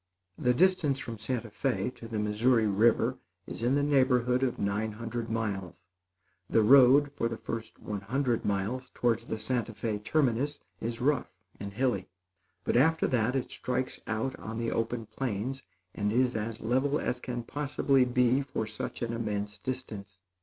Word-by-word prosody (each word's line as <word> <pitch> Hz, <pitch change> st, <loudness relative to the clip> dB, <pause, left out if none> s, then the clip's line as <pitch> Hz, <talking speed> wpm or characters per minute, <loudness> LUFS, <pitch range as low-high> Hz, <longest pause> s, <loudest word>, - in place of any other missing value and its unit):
The 125 Hz, 0 st, +2 dB
distance 180 Hz, -5 st, +3 dB
from 115 Hz, -4 st, -6 dB
Santa 115 Hz, 0 st, -3 dB
Fé 125 Hz, 0 st, -1 dB
to 115 Hz, -, -9 dB
the 110 Hz, -1 st, -4 dB
Missouri 110 Hz, +3 st, +2 dB
River 105 Hz, +3 st, +3 dB, 0.3 s
is -, -, -7 dB
in 125 Hz, +3 st, +2 dB
the 145 Hz, -, +2 dB
neighborhood 130 Hz, -3 st, +3 dB
of 130 Hz, -2 st, 0 dB
nine 105 Hz, +2 st, -1 dB
hundred 115 Hz, +1 st, -4 dB
miles. 95 Hz, -6 st, -3 dB, 0.7 s
The 110 Hz, -, +4 dB
road, 135 Hz, +4 st, +7 dB
for 115 Hz, -5 st, -1 dB
the 115 Hz, -, -4 dB
first 115 Hz, 0 st, -6 dB
one 105 Hz, -2 st, -5 dB
hundred 120 Hz, +3 st, 0 dB
miles 105 Hz, +6 st, -1 dB
towards 115 Hz, -1 st, +1 dB
the 110 Hz, -, -3 dB
Santa 120 Hz, 0 st, -2 dB
Fé 105 Hz, -1 st, -3 dB
terminus, 140 Hz, +2 st, +1 dB, 0.2 s
is 115 Hz, +1 st, -4 dB
rough 140 Hz, 0 st, +1 dB, 0.3 s
and 100 Hz, 0 st, -6 dB
hilly; 105 Hz, -5 st, 0 dB, 0.5 s
but, -, -, 0 dB
after 160 Hz, +6 st, +4 dB
that, 125 Hz, +1 st, +1 dB
it 135 Hz, -, -2 dB
strikes 130 Hz, 0 st, -3 dB
out 115 Hz, +4 st, -1 dB
on 110 Hz, 0 st, -6 dB
the 115 Hz, 0 st, -1 dB
open 115 Hz, 0 st, -1 dB
plains, 120 Hz, +3 st, -3 dB, 0.3 s
and 105 Hz, 0 st, -1 dB
is 125 Hz, +2 st, +2 dB
as 110 Hz, +1 st, -3 dB
level 130 Hz, +5 st, +1 dB
as 125 Hz, -, -2 dB
can 125 Hz, -1 st, -4 dB
possibly 140 Hz, 0 st, +1 dB
be 125 Hz, +1 st, +3 dB
for 130 Hz, -5 st, -3 dB
such 110 Hz, +2 st, -5 dB
an 115 Hz, 0 st, -2 dB
immense 105 Hz, -3 st, -3 dB
distance. 105 Hz, -6 st, -6 dB
115 Hz, 165 wpm, -30 LUFS, 110-130 Hz, 0.7 s, road